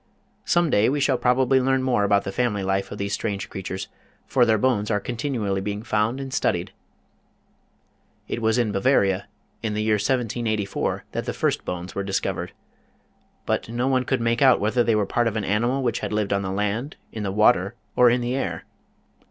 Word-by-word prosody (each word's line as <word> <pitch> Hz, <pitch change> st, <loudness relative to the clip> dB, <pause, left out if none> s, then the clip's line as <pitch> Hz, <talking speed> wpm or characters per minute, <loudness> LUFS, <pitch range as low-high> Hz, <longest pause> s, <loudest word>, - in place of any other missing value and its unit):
Some 175 Hz, -3 st, +2 dB
day 105 Hz, +3 st, +4 dB
we 145 Hz, +2 st, 0 dB
shall 135 Hz, -2 st, +2 dB
probably 130 Hz, +1 st, +3 dB
learn 130 Hz, 0 st, +1 dB
more 125 Hz, -5 st, +2 dB
about 100 Hz, 0 st, +3 dB
the 95 Hz, -, -4 dB
family 105 Hz, -2 st, 0 dB
life 95 Hz, 0 st, -1 dB
of 100 Hz, -, -6 dB
these 100 Hz, 0 st, -3 dB
strange 100 Hz, -2 st, -3 dB
creatures, 95 Hz, 0 st, -5 dB, 0.4 s
for 125 Hz, -2 st, +3 dB
their 110 Hz, -1 st, +4 dB
bones 105 Hz, -3 st, +1 dB
are 105 Hz, -2 st, +1 dB
continually 110 Hz, -4 st, -2 dB
being 105 Hz, +1 st, -4 dB
found 110 Hz, +3 st, 0 dB
and 135 Hz, -1 st, -6 dB
studied. -, -, 0 dB, 1.6 s
It 115 Hz, -, -3 dB
was 110 Hz, +1 st, +2 dB
in 120 Hz, -4 st, +1 dB
Bavaria, 100 Hz, -3 st, +2 dB, 0.3 s
in 110 Hz, -2 st, -2 dB
the 105 Hz, -, -1 dB
year 110 Hz, -1 st, +2 dB
1784, 110 Hz, -3 st, -1 dB
that -, -, -3 dB
the -, -, -3 dB
first -, -, -1 dB
bones 90 Hz, 0 st, -5 dB
were 100 Hz, -, -2 dB
discovered. 100 Hz, 0 st, -2 dB, 0.9 s
But -, -, -1 dB
no 120 Hz, +2 st, -1 dB
one 130 Hz, -1 st, +2 dB
could 130 Hz, -2 st, 0 dB
make 115 Hz, 0 st, +1 dB
out 130 Hz, -2 st, +6 dB
whether 110 Hz, +4 st, +2 dB
they 115 Hz, -2 st, +2 dB
were 105 Hz, -1 st, +2 dB
part 120 Hz, +4 st, +1 dB
of 115 Hz, -, -2 dB
an 110 Hz, -, -1 dB
animal 120 Hz, +6 st, +1 dB
which 120 Hz, -2 st, 0 dB
had -, -, -4 dB
lived 105 Hz, -1 st, 0 dB
on 100 Hz, -, +1 dB
the 95 Hz, -, -3 dB
land, 105 Hz, +8 st, -2 dB, 0.2 s
in 110 Hz, -, -6 dB
the 100 Hz, -2 st, -2 dB
water, 100 Hz, 0 st, +3 dB, 0.2 s
or 125 Hz, -1 st, +6 dB
in 125 Hz, +1 st, +2 dB
the 120 Hz, +1 st, -1 dB
air. 85 Hz, -11 st, -3 dB
110 Hz, 200 wpm, -24 LUFS, 100-125 Hz, 1.6 s, out